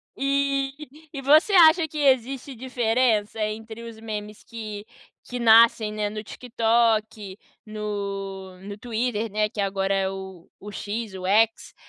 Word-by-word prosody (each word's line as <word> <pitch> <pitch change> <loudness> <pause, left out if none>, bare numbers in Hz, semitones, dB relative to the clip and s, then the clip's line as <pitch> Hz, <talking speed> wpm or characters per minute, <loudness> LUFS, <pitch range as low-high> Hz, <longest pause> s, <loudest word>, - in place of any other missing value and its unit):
E 275 0 0 0.4
e 275 - -5
você 310 +9 +4
acha 330 -2 +6
que 310 - -9
existe 265 -1 +1
diferença 230 -3 0
entre 220 +2 -5
os 230 -1 -10
memes 210 -1 -7
que 215 -3 -8 0.4
que 245 0 -4
nascem, 225 -1 +6
né, 210 -1 -2
no 215 +1 -6
TikTok, 225 -4 0 0.3
no 200 -3 -5
no 200 +1 -8
Twitter, 230 -1 -2
né, 210 0 0
que 210 - -10
agora 195 0 0
é 190 -1 +1
o 190 -2 -9
o 210 +1 -9
X, 210 +1 -5
o 185 0 -7
X, 220 +3 +2
220 Hz, 140 wpm, -24 LUFS, 205-245 Hz, 0.4 s, acha